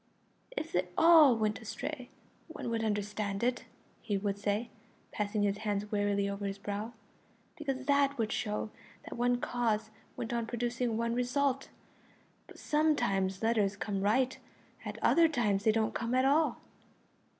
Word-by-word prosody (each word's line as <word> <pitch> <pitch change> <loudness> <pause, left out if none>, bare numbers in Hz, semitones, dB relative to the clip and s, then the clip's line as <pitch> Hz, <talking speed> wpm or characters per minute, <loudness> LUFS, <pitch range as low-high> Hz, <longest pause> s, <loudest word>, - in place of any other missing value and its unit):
"If 320 - -3
they 180 +1 0
all 320 -6 +8
went 215 -1 -1
astray 250 +4 -5 0.4
one 320 -7 -5
could 225 -1 -1
understand 210 -1 -2
it," 245 +1 0 0.4
he 205 -3 -1
would 200 0 -2
say, 205 +3 -1 0.4
passing 210 0 -1
his 200 0 0
hand 210 -1 -2
wearily 205 -1 +1
over 200 0 -3
his 195 0 -4
brow, 205 +3 -4 0.6
"because 270 -5 -4
that 280 0 +3
would 225 -2 -1
show 215 -1 -2 0.3
that - - -8
one 245 0 +1
cause 225 -3 -1 0.3
went 235 0 -4
on 235 -1 -1
producing 240 -1 -1
one 230 0 0
result, 265 +2 0 0.8
but - - -14
sometimes 235 -11 +1
letters 215 -3 +2
come 200 -1 -3
right, 250 +6 +1 0.4
at - - -6
other 335 -1 +6
times 210 -9 0
they 220 - +6
don't 220 0 0
come 235 +2 -1
at 255 +1 +3
all." 300 +4 +3
225 Hz, 150 wpm, -31 LUFS, 205-250 Hz, 0.8 s, all